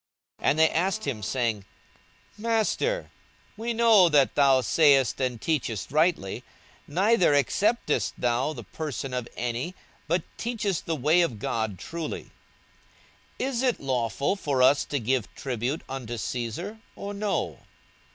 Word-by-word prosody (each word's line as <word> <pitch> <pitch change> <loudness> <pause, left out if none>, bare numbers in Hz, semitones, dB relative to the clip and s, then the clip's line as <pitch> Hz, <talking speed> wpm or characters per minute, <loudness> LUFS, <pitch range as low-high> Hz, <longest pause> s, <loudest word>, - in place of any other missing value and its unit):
42:020:021 - - +2
And 150 - +1
they 160 - +6
asked 190 +6 0
him, 130 -7 -3
saying, 110 -3 -1 0.7
Master, 230 - 0 0.4
we 230 +2 -3
know 225 -6 +6
that 145 -4 +4
thou 135 -2 +5
sayest 135 -2 +4
and 125 -3 -1
teachest 120 -7 -2
rightly, 155 - +1 0.4
neither 185 -1 +3
acceptest 150 - +1
thou 125 +4 +1
the 125 -6 -7
person 135 +4 -5
of 125 -2 -2
any, 125 +9 -3 0.3
but 170 +1 +1
teachest 215 -6 -2
the 165 - 0
way 155 +5 +3
of 140 -10 0
God 110 -1 -2
truly: 165 - -6 1.1
42:020:022 260 - 0
Is 240 -2 -1
it 255 -3 +1
lawful 130 - 0
for 140 -9 0
us 140 +3 +5
to 145 - -2
give 125 0 -1
tribute 130 +3 -3
unto 125 -3 -5
Caesar, 125 - -4 0.2
or 200 0 -6
no? 205 0 -2
145 Hz, 140 wpm, -26 LUFS, 125-190 Hz, 1.1 s, they